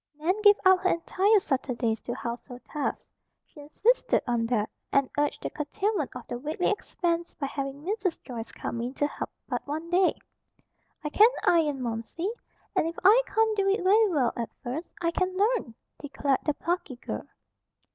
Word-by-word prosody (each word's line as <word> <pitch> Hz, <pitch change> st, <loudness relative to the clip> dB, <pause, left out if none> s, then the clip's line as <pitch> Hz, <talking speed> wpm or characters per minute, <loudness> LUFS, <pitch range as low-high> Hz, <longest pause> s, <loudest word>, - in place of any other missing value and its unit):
Nan 320 Hz, +4 st, +1 dB
gave 410 Hz, -1 st, +8 dB
up 375 Hz, 0 st, +7 dB
her 370 Hz, 0 st, +1 dB
entire 385 Hz, +5 st, +3 dB
Saturdays 250 Hz, -, -1 dB
to 240 Hz, -, -4 dB
household 245 Hz, +1 st, -6 dB
tasks. 295 Hz, -2 st, -3 dB, 0.4 s
She -, -, -17 dB
insisted 440 Hz, +13 st, +2 dB
on 235 Hz, -2 st, 0 dB
that, 220 Hz, -3 st, +1 dB, 0.2 s
and 275 Hz, -2 st, +2 dB
urged 290 Hz, 0 st, 0 dB
the -, -, -3 dB
curtailment 315 Hz, +1 st, -2 dB
of 250 Hz, -, -7 dB
the 240 Hz, -, -4 dB
weekly 310 Hz, +8 st, 0 dB
expense 340 Hz, -4 st, -2 dB
by 285 Hz, -, -3 dB
having 275 Hz, +1 st, -4 dB
Mrs. 385 Hz, -1 st, -1 dB
Joyce 230 Hz, -3 st, -6 dB
come 235 Hz, -, -4 dB
in 250 Hz, +3 st, -4 dB
to 290 Hz, -, +1 dB
help 295 Hz, -, -4 dB, 0.2 s
but -, -, -2 dB
one 315 Hz, +4 st, -4 dB
day. 365 Hz, +1 st, +4 dB, 0.9 s
"I 300 Hz, -, -2 dB
can 430 Hz, +9 st, +7 dB, 0.2 s
iron, 300 Hz, -6 st, +3 dB
Momsey, 235 Hz, -, -3 dB, 0.4 s
and -, -, +2 dB
if 335 Hz, -, -5 dB
I 425 Hz, +6 st, +7 dB
can't 440 Hz, +1 st, +2 dB
do 395 Hz, -1 st, +2 dB
it 395 Hz, -1 st, +1 dB
very 420 Hz, +3 st, +5 dB
well 280 Hz, -9 st, +1 dB
at 235 Hz, -1 st, -3 dB
first, 270 Hz, +7 st, -4 dB
I 335 Hz, -, +2 dB
can 370 Hz, +1 st, -1 dB
learn," 410 Hz, -, +1 dB, 0.2 s
declared 280 Hz, -1 st, 0 dB
the 300 Hz, -2 st, +1 dB
plucky 335 Hz, -5 st, -2 dB
girl. 245 Hz, -, -6 dB
310 Hz, 175 wpm, -28 LUFS, 260-375 Hz, 0.9 s, gave